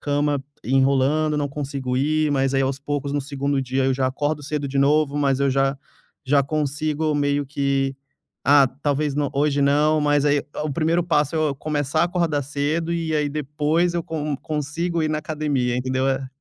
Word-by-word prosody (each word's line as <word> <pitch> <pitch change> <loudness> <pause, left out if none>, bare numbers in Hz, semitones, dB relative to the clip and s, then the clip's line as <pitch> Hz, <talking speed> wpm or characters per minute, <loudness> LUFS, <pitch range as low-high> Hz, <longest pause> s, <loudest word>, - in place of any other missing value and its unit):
cama 145 -1 0 0.2
enrolando, 140 +4 +2
não 145 -1 0
consigo 135 -3 -3
ir, 155 +2 +1
mas, 135 0 +1
aí, 135 - +3
aos 135 0 -1
poucos 140 0 -3
no 145 - 0
2º 140 0 -2
dia 130 +1 -1
eu 135 - +2
já 130 0 0
acordo 145 +3 -2
cedo 145 0 -3
de 135 - -2
novo, 145 +1 +3
mas 135 -2 +2
eu 140 -1 +2
já 135 +1 +1 0.5
já 140 +1 +3
consigo 150 +1 -1
meio 145 0 +1
que: 135 -1 0 0.5
"Ah 140 0 +6 0.2
talvez 145 0 0
nã 145 0 0
hoje 145 0 +1
não", 150 +2 +3
mas, 145 -1 +2
aí, 145 0 +3
eh, 145 - -6 0.2
o 150 - -2
1º 165 +3 +1
passo 150 -2 +1
é - - +1
eu 155 -3 +1
começar 150 0 -1
a - - +5
acordar 170 -4 0
cedo, 145 +4 -2
e 165 -2 -1
aí, 150 -1 +1
depois 150 +4 0
eu 170 - 0
con 150 -2 -3
consigo 160 +4 -2
ir 155 - +1
na 155 - 0
academia 145 -5 -1
entendeu? 130 +1 0
É 135 0 -1
145 Hz, 195 wpm, -22 LUFS, 135-155 Hz, 0.5 s, Ah